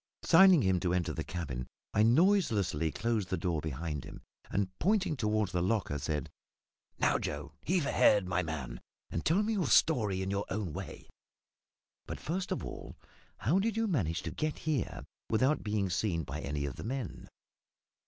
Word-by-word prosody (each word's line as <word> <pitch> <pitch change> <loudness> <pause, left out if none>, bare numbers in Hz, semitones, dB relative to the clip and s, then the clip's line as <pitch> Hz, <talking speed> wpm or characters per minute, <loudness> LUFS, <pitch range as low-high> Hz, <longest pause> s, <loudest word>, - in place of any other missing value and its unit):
Signing 185 -2 +7
to 95 - +1
him 95 -1 +3
to 90 0 0
enter 90 -3 0
the - - -3
cabin, 70 -7 -5 0.3
I 105 - +3
noiselessly 115 - +3
closed 110 -3 -1
the 95 - 0
door 85 -5 -1
behind 75 -1 -4
him, 70 - -10 0.3
and, 100 -1 0
pointing 195 -2 +2
toward 110 -5 0
the 90 - -1
locker, 95 -6 0
said 75 -1 -3 0.7
"Now, - - +2
Joe, - - -5
heave 175 -3 +1
ahead, 105 -7 +4
my 90 0 +1
man, 70 -8 -5 0.3
and - - -2
tell 185 +7 +3
me 220 +2 0
your 185 -8 0
story 105 - +3
in 95 - -2
your 100 +1 -1
own 95 -5 -3
way. - - -7 1.0
But, - - -5
first 180 +4 -3
of - - -2
all, - - -8 0.4
how 145 - +2
did 220 +2 0
you 225 - +2
manage 95 - 0
to - - -4
get 155 -1 -2
here 150 -7 -2 0.3
without 130 +7 +2
being 105 -2 0
seen 90 -3 0
by - - -5
any 70 0 -2
of 70 - -5
the - - -6
men?" 125 -2 -5
105 Hz, 180 wpm, -32 LUFS, -, 1.0 s, Signing